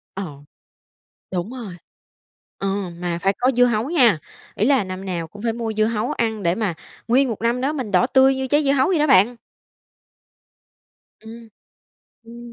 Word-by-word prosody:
Ờ. 160 -8 -6 0.9
Đúng 180 +3 -3
rồi. 220 -9 -8 0.8
Ờ, 195 - -2 0.3
mà 175 -1 -2
phải 195 +1 +2
có 255 +2 +3
dưa 245 - +6
hấu 235 +3 0
nha, 240 - +4 0.4
ý 210 - +1
là 270 -7 +3
năm 185 +1 -7
nào 170 -3 -3
cũng 205 +3 -13
phải 230 -1 0
mua 225 -2 -4
dưa 215 0 +2
hấu 225 +1 -1
ăn 220 -3 -2
để 170 +2 +1
mà 210 -6 -1 0.3
nguyên 255 +2 +3
một 220 - -5
năm 240 +2 0
đó 285 +3 0
mình 250 -8 -4
đỏ 180 +6 +3
tươi 265 0 +4
như 265 0 -3
trái 295 +3 +2
dưa 275 - +2
hấu 265 -1 +3
vậy 345 -5 +2
đó 300 - +2
bạn. 210 +3 +5 1.8
Ừm. 225 +1 -12 0.8
Ừm. 235 +1 -11
230 Hz, 180 wpm, -21 LUFS, 195-255 Hz, 1.8 s, dưa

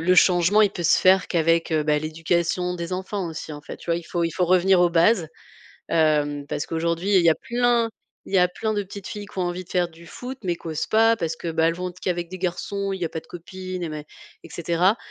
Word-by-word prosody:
le 180 +3 +3
changement, 180 +3 +5
il 205 - +4
peut 175 - -5
se 165 - +4
faire 190 0 +4
qu'avec, 165 -1 +2
heu, 155 -1 +2
ben 150 0 +1
l'éducation 170 +3 -1
des 170 0 -5
enfants 190 +1 -3
aussi 160 -1 -7
en 145 - -8
fait, - - -9
tu - - -7
vois? 170 - +2
Il 170 - -5
faut 170 +1 -2
il 165 - 0
faut 180 +2 0
revenir 185 +1 +4
aux 175 - +5
bases. 170 0 +3 0.6
Hem, 150 -3 +1
parce 145 - -3
qu'aujourd'hui, 170 +4 -1
il 185 - +5
y - - +6
a - - +4
plein 240 +1 +1 0.4
il - - -7
y 190 - +6
a 180 - +5
plein 215 +5 -3
de 205 -1 -1
petites 195 0 -9
filles 205 -1 -6
qui 200 - -11
ont - - +1
envie 175 +1 -3
de - - -29
faire 180 -1 +1
du 165 0 -16
foot 255 +7 -8
mais 175 -2 0
qui - - -14
osent 160 0 -2
pas 225 +1 +4
parce 165 -5 -2
que, 170 - -4
bah, 160 0 +2
elles 165 - 0
vont 180 +1 -4
être 180 - -17
qu'avec 175 -2 -2
des 185 +1 -8
garçons, 195 +2 -2
il 190 - -5
y - - 0
a - - -1
pas 160 - -5
de - - -23
copines 185 +1 -7
et 170 - -2
mais 150 -1 -6 0.4
et - - -10
cetera 175 +5 +1
175 Hz, 270 wpm, -24 LUFS, 165-190 Hz, 0.6 s, y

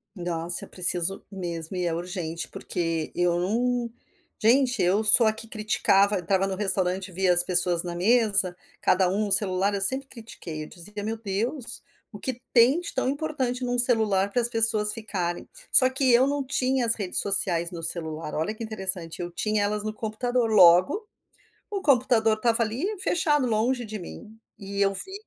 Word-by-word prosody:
Nossa, 175 -2 -1
preciso 180 +1 +2
mesmo, 170 -2 -6
e 180 -1 -2
é 165 - -2
urgente 170 -1 -5
porque 165 -2 -4
eu 175 -1 0
não, 240 +5 -2 0.5
gente 250 0 +2
eu 190 +5 +1
sou 220 +2 +4
a 220 - +2
que 225 +1 -9
criticava, 210 -2 +1
eu - - -2
estava 190 +2 0
no 195 - -4
restaurante 190 -1 +1
via 185 0 0
as 175 0 +5
pessoas 175 -1 +1
na 175 -1 -6
mesa, 200 -2 +2 0.3
cada 185 0 +2
um 205 +4 -1
no 200 - +3
celular, 195 0 +5
eu 200 - -3
sempre 265 +7 +6
critiquei, 220 -11 -9
eu - - -13
dizia: 205 +4 -9
"Meu 220 +2 -4
Deus, 225 +5 -4 0.3
o 205 - -10
que 255 +3 -5
tem 250 +5 +4
de 350 - -6
tão 260 - -2
importante 265 -3 -3
num 245 0 -2
celular 215 -5 +3
pras 240 +2 0
pessoas 220 -2 +3
ficarem?". 190 -6 -5 0.2
Só 255 -2 +6
que 260 0 0
eu 245 +2 +4
não 285 0 -2
tinha 260 0 0
as 230 -1 +5
redes 195 -4 -1
sociais 175 -4 +3
no 170 -2 -9
celular, 160 -2 -2
olha 160 +8 -3
que 220 - -10
interessante, 190 -6 -4
eu 175 - -6
tinha 215 +4 -2
elas 210 +1 -2
no 215 0 -5
computador, 230 +2 -3
logo, 195 - +4 0.6
o 400 -2 -5
computador 240 - +2
estava 230 +1 +1
ali 230 - -4 0.2
fechado, 295 -7 +1
longe 240 +2 -1
de 215 -1 -8
mim, 215 +5 -12 0.2
e 200 -1 -8
eu 195 0 +1
vi 290 - -3
210 Hz, 180 wpm, -24 LUFS, 180-240 Hz, 0.6 s, sempre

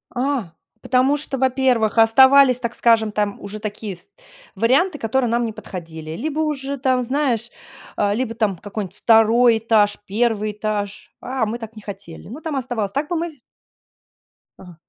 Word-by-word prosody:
А, 250 - -1 0.3
потому 265 +3 +2
что, 280 -2 -3
во-первых, 255 -4 +1
оставались, 260 +3 +6
так 235 -2 -3
скажем, 225 -2 +3
там 210 -1 -2
уже 205 +1 -6
такие 210 -2 -5
вс - - -13 0.5
варианты, 275 - +2
которые 245 +2 0
нам 235 +1 +1
не 225 - -3
подходили, 160 -6 -8
либо 305 - -3
уже 280 -3 -2
там, 255 -1 +1
знаешь, 245 -3 -1 0.5
э, 205 0 +1
либо 240 -1 -2
там 215 -5 -1
какой-нибудь 200 -1 -6
2 225 +1 +5
этаж, 220 -2 +2
1 215 0 0
этаж, 210 -1 -4
а 255 -2 -2
мы 220 +3 -3
так 225 -1 -9
не 215 - -10
хотели, 195 -4 -10
ну, 280 +7 -9
там 320 -3 -4
оставалось, 245 -6 -2
так 290 - -2
бы 345 - -1
мы 340 +1 -2
вз 300 - -17 1.2
Ага. 180 -2 -13
230 Hz, 165 wpm, -21 LUFS, 210-265 Hz, 1.2 s, оставались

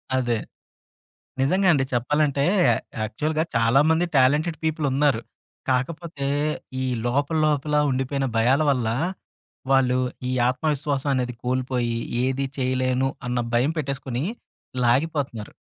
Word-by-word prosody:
అదే. 120 -3 +1 1.0
నిజంగా 185 +9 +2
అండి 140 -4 +2
చెప్పాలంటే 140 +3 +1 0.6
యాక్చువల్‌గా 155 +9 -1
చాలామంది 145 +9 +3
టాలెంటెడ్ 150 +5 +3
పీపులున్నారు. 145 -5 +1 0.5
కాకపోతే 145 +3 -2 0.6
ఈ - - -1 0.2
లోపల, 145 +6 0
లోపల 150 0 0 0.2
ఉండిపోయిన 135 +1 -1
భయాల 125 +6 +3
వల్ల 125 -5 0 0.8
వాళ్ళు 130 -1 +3 0.3
ఈ - - -1 0.2
ఆత్మవిశ్వాసమనేది 135 -2 -1
కోల్పోయి, 125 -2 -1 0.3
ఏది 135 +1 0
చేయలేను 130 0 +1 0.2
అన్న 125 0 0 0.2
భయం 125 +6 +2
పెట్టేసుకొని 135 -2 -3 0.6
లాగిపోతున్నారు. 130 -3 0
135 Hz, 95 wpm, -24 LUFS, 125-150 Hz, 1.0 s, చాలామంది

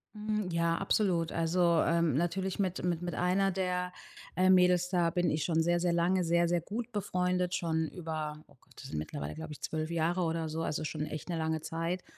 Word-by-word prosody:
Mhm, 210 -2 -2
ja, 170 0 +1
absolut. 185 -4 +1
Also, 170 0 +3
ähm, 170 -3 +2
natürlich 180 +4 -1
mit 185 -3 -1
mit 175 -1 -1
einer 190 +2 +2
der, 180 -1 -1 0.4
äh, 185 +1 +4
Mädels, 180 -1 +4
da 175 -3 +2
bin 175 0 +1
ich 155 -1 0
schon 165 -2 +2
sehr, 175 +1 +2
sehr 175 0 +1
lange 180 +2 +2
sehr, 170 0 +2
sehr 175 0 +2
gut 225 +8 -5
befreundet. 180 -3 0
Schon 160 -2 0
über, 155 -3 -5
oh 145 - -22
Gott, - - -24
das - - -9
sind 75 - -4
mittlerweile, 80 - -5
glaube 160 0 -7
ich, 150 - -11
12 155 0 -2
Jahre 170 +2 0
oder 165 -1 -1
so. 160 +1 -2
Also, 155 - -2
ist 155 - -2
schon 155 -1 -3
echt 155 +2 -6
'ne 170 - -1
lange 160 -1 -1
Zeit. 165 +3 -3
170 Hz, 210 wpm, -31 LUFS, 160-180 Hz, 0.4 s, äh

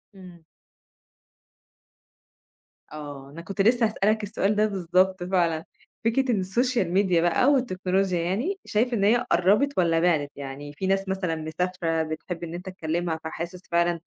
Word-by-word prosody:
إمم. 180 -3 -13 2.5
آه، 145 -3 -8
أنا 155 +4 -9
كنت 195 +4 -3
لسه 230 +3 +4
هاسألك 215 0 +1
السؤال 205 0 0
ده 210 +1 +3
بالضبط، 185 -1 +1
فعلًا 170 -3 0 0.4
فكرة 250 +3 +2
إن 200 -4 +1
الSocial 240 +6 +1
Media 190 -3 +3
بقى 175 +5 +2
أو 280 +2 +5
التكنولوجيا 190 -5 0
يعني، 230 - -1
شايف 240 +3 0
إن 200 -4 +1
هي 240 +4 +3
قرّبِت 210 +11 +3
والَّا 165 -2 +3
بعدت؟ 155 -5 +1
يعني 140 +1 -7
في 190 +6 -3
ناس 195 0 0
مثلًا 185 -4 -1
مسافرة 165 +1 -2
بتحب 160 +2 -6
إن 165 -1 -5
أنت 180 +2 -6
تكلمها، 170 -2 -2
فحاسس 170 +3 -6
فعلًا 170 0 +2
185 Hz, 150 wpm, -25 LUFS, 165-205 Hz, 2.5 s, أو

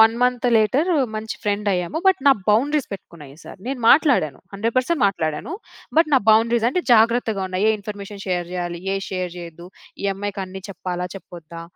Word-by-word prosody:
1 225 +1 +6
month 250 0 +1
later 270 - +2 0.3
మంచి 220 +1 -5
friend 205 0 0
అయ్యాము 180 - -2
but 380 - +5
నా - - +9 0.2
బౌండరీస్ 275 +7 +2
పెట్టుకున్నా 170 -5 -12
ఈసారి. 170 +3 -13
నేను 270 -2 -3
మాట్లాడాను 275 - +3
100% 255 +8 0
మాట్లాడాను 160 - -2 0.5
బట్ 325 -2 +4
నా - - +7
బౌండరీస్ 230 +1 +3
అంటే 360 +5 -1
జాగ్రత్తగా 225 -2 +2
ఉన్నా. 185 0 -3
ఏ - - +6
ఇన్ఫర్‌మేషన్ 205 -1 -8
షేర్ 175 -2 -1
జేయ్యాలి, 175 -1 -4
ఏ - - 0
షేర్ 185 -2 -3
జేయొద్దు, 170 0 -9 0.3
ఈ - - 0
అమ్మాయికి 200 0 -4
అన్నీ 190 0 -9
చెప్పాలా, 180 -1 -4
చెప్పొద్దా 170 -2 -11
205 Hz, 170 wpm, -21 LUFS, 180-240 Hz, 0.5 s, నా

